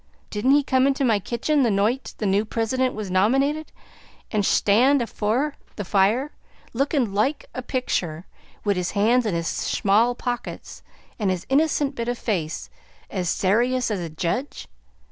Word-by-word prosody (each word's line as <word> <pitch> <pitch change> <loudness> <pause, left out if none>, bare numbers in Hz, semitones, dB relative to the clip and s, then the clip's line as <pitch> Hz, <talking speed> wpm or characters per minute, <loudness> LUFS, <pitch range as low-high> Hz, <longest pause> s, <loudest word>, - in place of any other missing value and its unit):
Didn't 245 +6 +2
he 290 - +3
come 260 -1 +3
into 275 0 +1
my 220 -4 +3
kitchen 245 +9 0
the 245 - +3
noight 215 +6 0
the 215 - -3
new 200 +1 +2
Prisident 245 +4 -1
was 210 -3 -5
nominated 270 +11 +1 0.6
and 210 -2 +1
shtand 245 +9 +4
afore 240 +5 -1 0.2
the 205 - -5
fire, 215 +10 +2 0.4
lookin' 265 -4 0
loike 260 +9 0
a 255 - -4
pictur', 185 - -2 0.4
wid 200 -2 +1
his 180 -1 -2
hands 230 +3 +3
in 190 - -1
his 165 0 -2
shmall 225 +8 +1
pockets, 245 -1 -5 0.4
an' 205 -3 +1
his 185 -1 -2
innocent 290 0 +2
bit 235 -3 -4
of 245 0 -1
a - - -17
face 170 -8 -3 0.4
as 180 -3 -2
sayrious 240 +7 +1
as 205 - -1
a 170 -2 -4
jedge? 175 - -3
230 Hz, 165 wpm, -23 LUFS, 200-260 Hz, 0.6 s, shtand